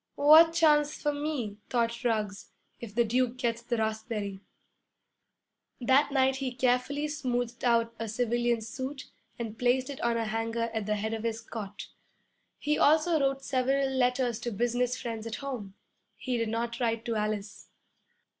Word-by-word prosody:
'What 315 +3 +8
chance 300 -3 +3
for 295 -1 0
me,' 285 -8 -3
thought 235 0 0
Ruggs, 215 -4 -1 0.3
'if 220 -3 -9
the 240 - +4
Duke 245 +2 0
gets 235 -2 -1
the 235 0 -2
raspberry?' 220 -3 -3 1.4
That 265 +4 +3
night 265 -1 +3
he 260 -2 -3
carefully 255 +4 +1
smoothed 245 -5 -3
out 230 -1 +2
a 225 - -3
civilian 240 +1 0
suit 260 +4 -6 0.3
and 225 -2 -6
placed 255 +2 +2
it 275 - -8
on 235 -1 +1
a 230 - -1
hanger 225 +1 -2
at 220 -2 -3
the 210 - +1
head 220 +2 -2
of 225 - -3
his 225 0 -2
cot. 215 -3 -7 0.7
He 300 +1 0
also 315 +2 +4
wrote 275 -1 0
several 270 +1 +1
letters 250 -2 +1
to 240 0 -4
business 245 +3 0
friends 230 -2 -5
at 225 - -4
home. 240 -9 -6 0.4
He 255 -2 -3
did 230 -2 -1
not 235 +1 -2
write 230 -2 -1
to 230 - -1
Alice. 210 -1 -3
240 Hz, 160 wpm, -29 LUFS, 225-265 Hz, 1.4 s, What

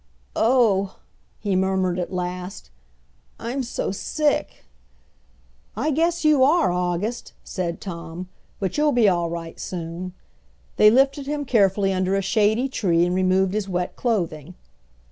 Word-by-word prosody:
"Oh!" 220 -5 +2 0.4
he 200 -3 -1
murmured 190 -1 +1
at 175 0 -3
last, 180 - -5 0.7
"I'm 245 +4 -3
so 240 -5 -3
sick!" 295 +9 -1 1.1
"I 295 +7 0
guess 335 +2 +1
you 300 -4 +5
are, 315 - +4
August," 180 +6 -2
said 175 -3 -4
Tom, 170 -1 -7 0.3
"but 195 +8 -2
you'll 300 -1 +3
be 240 -3 +4
all 175 -3 +2
right 165 -1 -6
soon." 175 +1 -5 0.6
They 210 - +8
lifted 275 +4 +2
him 290 0 -2
carefully 195 -5 +2
under 185 +1 0
a 195 - 0
shady 220 +6 +2
tree 175 -9 +1
and 175 - -1
removed 185 +1 +2
his 210 -2 -2
wet 180 -1 -2
clothing. 175 - -2
190 Hz, 135 wpm, -23 LUFS, 180-245 Hz, 1.1 s, They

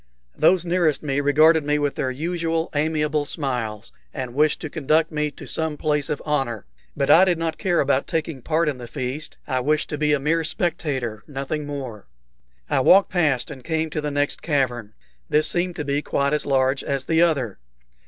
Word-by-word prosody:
Those 180 -1 +3
nearest 170 -4 +1
me 140 -1 0
regarded 155 +3 +5
me 150 +1 +1
with 145 -1 0
their 130 - -2
usual 165 +3 -2
amiable 150 -1 0
smiles, 120 -8 -3 0.2
and 130 -4 -5
wished 150 +3 +2
to 155 - -4
conduct 155 +2 +1
me 150 -1 -1
to - - -12
some 160 -2 -2
place 150 -2 0
of 150 - -3
honor; 135 -8 -1 0.3
but 140 - +2
I 175 - +8
did 180 -3 +2
not 165 -1 -3
care 175 -3 +1
about 140 -1 +1
taking 160 -4 -3
part 160 +4 +1
in 140 -4 -2
this 120 -1 -8
feast. 135 +3 -5
I 130 - 0
wished 150 +4 0
to 150 - -4
be 150 -1 +2
a 150 - +2
mere 160 +4 +1
spectator, 135 - -2
nothing 145 +1 -4
more. 130 -8 -6 0.6
I 145 - +1
walked 190 +9 +5
past 150 -8 +1
and 130 -3 -10
came 160 0 -1
to 155 - -2
the 150 - -2
next 145 0 -1
cavern. 125 -8 -1 0.4
This 155 +1 +3
seemed 175 +1 0
to 150 -4 -4
be 140 +1 0
quite 140 -1 0
as 150 - -1
large 135 0 +2
as 140 -1 -2
the 165 0 +2
other. 140 - +1
150 Hz, 195 wpm, -23 LUFS, 135-160 Hz, 0.6 s, I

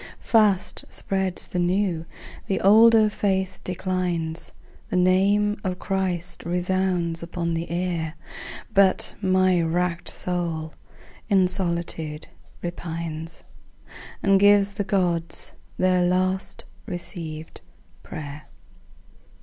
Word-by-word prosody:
Fast 210 -5 +2
spreads 190 -2 +1
the 180 - -3
new; 175 -2 0 0.4
the 195 - 0
older 220 +2 +6
faith 190 -3 -1
declines. 180 -3 -2 0.4
The - - -2
name 200 +3 +2
of 185 -2 -2
Christ 185 -3 -2
resounds 180 -1 0
upon 170 0 -3
the 165 +1 -3
air. 170 -2 -2 0.6
But 195 -1 +3
my 185 -2 +3
wrack'd 170 +1 -1
soul 165 -3 -1 0.6
in 190 -3 +4
solitude 170 -4 -1 0.4
repines 165 -2 -5 0.8
And 195 -1 +4
gives 205 0 +5
the 205 +1 -2
Gods 175 -4 0 0.2
their 185 -1 +3
last 185 +2 0 0.2
receivèd 170 -4 -3 0.4
pray'r. 150 0 -8
180 Hz, 95 wpm, -24 LUFS, 170-190 Hz, 0.8 s, older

